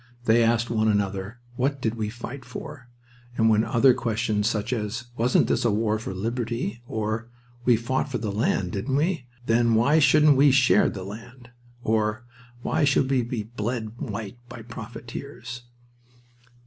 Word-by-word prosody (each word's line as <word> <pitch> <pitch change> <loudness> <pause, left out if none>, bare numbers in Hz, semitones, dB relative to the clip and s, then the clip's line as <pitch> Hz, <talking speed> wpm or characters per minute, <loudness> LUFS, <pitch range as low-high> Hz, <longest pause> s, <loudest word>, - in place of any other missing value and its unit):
They 115 +1 +5
asked 115 +1 +1
one 110 -1 +2
another, 100 +1 -1 0.2
"What 135 +2 0
did 115 -3 -1
we 110 -2 -3
fight 120 +3 -8
for?" 125 0 -9 0.5
and 110 -1 +4
then 110 +1 +3
other 125 +3 +4
questions 110 -3 0
such 110 +1 -2
as, 115 +1 -3
"Wasn't 120 +2 +3
this - - 0
a 120 - +3
war 110 +1 +1
for 110 - -5
liberty?" 115 +4 -3
or, 110 +1 -3 0.4
"We 125 - +6
fought 130 +5 -1
for 130 - -2
the 110 -3 -3
land, 100 -3 0
didn't 115 +8 -2
we? 155 -3 0 0.2
Then 115 0 +3
why 140 +8 +4
shouldn't 150 0 +5
we 140 +2 +6
share 130 -2 +4
the 95 - -6
land?" 120 +5 -10 0.3
Or, 110 +2 0 0.4
"Why 160 - +1
should 140 -1 +3
we 130 -2 +3
be 115 -2 -3
bled 115 0 -4
white 110 0 -5
by 115 - -9
profiteers?" 120 +2 -8
115 Hz, 160 wpm, -25 LUFS, 110-125 Hz, 0.5 s, We